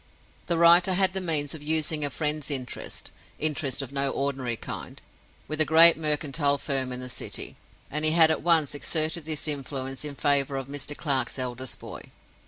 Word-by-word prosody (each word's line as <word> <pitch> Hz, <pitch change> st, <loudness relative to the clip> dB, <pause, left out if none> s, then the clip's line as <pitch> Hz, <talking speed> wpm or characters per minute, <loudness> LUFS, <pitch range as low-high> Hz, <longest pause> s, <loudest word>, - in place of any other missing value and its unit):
The 170 Hz, -, +1 dB
writer 175 Hz, +3 st, +5 dB
had 190 Hz, 0 st, +2 dB
the 190 Hz, -, -2 dB
means 150 Hz, -5 st, 0 dB
of 160 Hz, -, -9 dB
using 155 Hz, 0 st, +1 dB
a 145 Hz, -, -1 dB
friend's 150 Hz, +2 st, -1 dB
interest—interest 140 Hz, +2 st, -4 dB
of 135 Hz, -, -9 dB
no 140 Hz, 0 st, 0 dB
ordinary 135 Hz, -4 st, -3 dB
kind—with 155 Hz, +6 st, -8 dB
a -, -, +8 dB
great 165 Hz, +2 st, +8 dB
Mercantile 150 Hz, -2 st, 0 dB
Firm 135 Hz, -3 st, -2 dB
in 125 Hz, -, -6 dB
the 125 Hz, -, -6 dB
City; 125 Hz, -, -3 dB, 0.4 s
and 150 Hz, +2 st, -3 dB
he 155 Hz, -, +4 dB
had 160 Hz, 0 st, +5 dB
at -, -, -2 dB
once 160 Hz, -3 st, +2 dB
exerted 155 Hz, +2 st, -1 dB
this 155 Hz, -1 st, -1 dB
influence 135 Hz, -2 st, -4 dB
in 145 Hz, -1 st, -6 dB
favor 140 Hz, -1 st, +1 dB
of 135 Hz, -1 st, -6 dB
Mr. 145 Hz, +1 st, -4 dB
Clare's 140 Hz, -4 st, 0 dB
eldest 130 Hz, 0 st, -3 dB
boy. -, -, -10 dB
145 Hz, 175 wpm, -25 LUFS, 135-160 Hz, 0.4 s, a